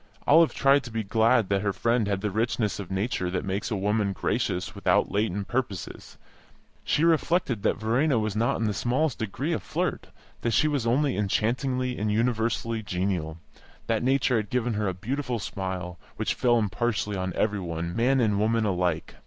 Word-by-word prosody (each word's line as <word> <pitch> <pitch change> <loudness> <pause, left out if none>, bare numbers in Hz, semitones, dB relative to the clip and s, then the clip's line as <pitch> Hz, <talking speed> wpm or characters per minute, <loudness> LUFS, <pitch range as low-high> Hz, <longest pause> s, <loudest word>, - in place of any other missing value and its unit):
Olive 165 +2 +6
tried 140 0 +4
to - - -6
be 110 0 -2
glad 115 +2 +3
that 100 -1 +1
her 100 0 0
friend 115 +1 +1
had 100 -1 -1
the 105 -1 -1
richness 110 0 -1
of 100 - -6
nature 95 -1 -1
that 90 +1 -2
makes 100 +4 -2
a 110 - -1
woman 105 0 0
gracious 90 -1 -1
without - - +1
latent 100 -1 -1
purposes; 120 -8 -4 0.7
she 150 - +1
reflected 165 - +2
that - - +1
Verena 120 +6 +1
was 110 -2 -1
not 120 +5 +1
in - - -1
the 105 -2 0
smallest 125 +7 0
degree 130 - -2
a - - 0
flirt, - - -3 0.3
that 120 - 0
she 155 - +4
was 140 -6 0
only 135 +3 +2
enchantingly 125 +5 0
and 105 0 0
universally 115 0 0
genial, 90 -5 -2 0.5
that 115 -2 0
nature 130 -1 +2
had 110 -2 -2
given 120 0 0
her 105 -1 -1
a 95 - -2
beautiful 125 +5 -3
smile, 95 -4 -5 0.2
which - - -1
fell 120 -1 +2
impartially 105 0 -1
on 95 -1 -2
every 105 -1 0
one, 85 -1 -4
man 130 +3 +3
and 105 -4 +2
woman, 110 +1 +2
alike. 90 -4 -1
110 Hz, 185 wpm, -26 LUFS, 100-125 Hz, 0.7 s, Olive